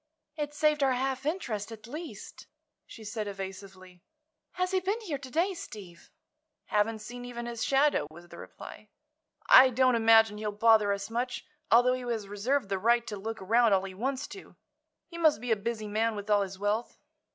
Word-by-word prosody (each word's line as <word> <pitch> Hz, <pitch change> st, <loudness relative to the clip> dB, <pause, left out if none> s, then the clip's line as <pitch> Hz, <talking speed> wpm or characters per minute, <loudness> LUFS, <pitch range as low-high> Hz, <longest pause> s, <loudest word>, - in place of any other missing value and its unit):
"It 295 Hz, -2 st, -3 dB
saved 300 Hz, 0 st, +2 dB
our 270 Hz, -2 st, +3 dB
half 265 Hz, +2 st, -2 dB
interest, 230 Hz, -, -3 dB
at 215 Hz, -1 st, -10 dB
least," 310 Hz, +8 st, -9 dB, 0.4 s
she 225 Hz, -, -12 dB
said, 215 Hz, 0 st, -4 dB
evasively. 190 Hz, -2 st, -9 dB, 0.5 s
"Has 365 Hz, 0 st, -1 dB
he 380 Hz, -, +2 dB
been 395 Hz, +5 st, -2 dB
here 320 Hz, -10 st, -4 dB
to 265 Hz, -2 st, -10 dB
day, 345 Hz, +8 st, +1 dB
Steve?" 190 Hz, -, -11 dB, 0.6 s
"Haven't 215 Hz, +1 st, 0 dB
seen 245 Hz, +2 st, -8 dB
even 240 Hz, -1 st, -6 dB
his 235 Hz, -1 st, -4 dB
shadow," 275 Hz, -, +2 dB
was 170 Hz, +3 st, -14 dB
the -, -, -11 dB
reply. -, -, -11 dB, 0.6 s
"I 260 Hz, 0 st, +9 dB
don't 255 Hz, +1 st, +3 dB
imagine 225 Hz, -2 st, +5 dB
he'll 215 Hz, -1 st, -2 dB
bother 215 Hz, -1 st, +4 dB
us 200 Hz, +2 st, -4 dB
much, 245 Hz, +2 st, -3 dB, 0.2 s
although 245 Hz, +2 st, +5 dB
he 255 Hz, -, -3 dB
has 230 Hz, -4 st, -3 dB
reserved 205 Hz, +4 st, -1 dB
the 195 Hz, -1 st, -1 dB
right 235 Hz, +3 st, +3 dB
to 210 Hz, -, -5 dB
look 220 Hz, +1 st, -6 dB
around 230 Hz, +2 st, +4 dB
all 190 Hz, -1 st, +2 dB
he 195 Hz, -1 st, -7 dB
wants 260 Hz, +7 st, -3 dB
to. 390 Hz, -, -12 dB, 0.5 s
He 340 Hz, -1 st, -10 dB
must 315 Hz, -8 st, +4 dB
be 245 Hz, +1 st, -4 dB
a -, -, +5 dB
busy 215 Hz, +1 st, -4 dB
man, 220 Hz, +2 st, 0 dB
with 205 Hz, +1 st, -5 dB
all 205 Hz, -1 st, +4 dB
his 195 Hz, -1 st, -4 dB
wealth." 205 Hz, +4 st, -2 dB
230 Hz, 190 wpm, -29 LUFS, 205-265 Hz, 0.6 s, I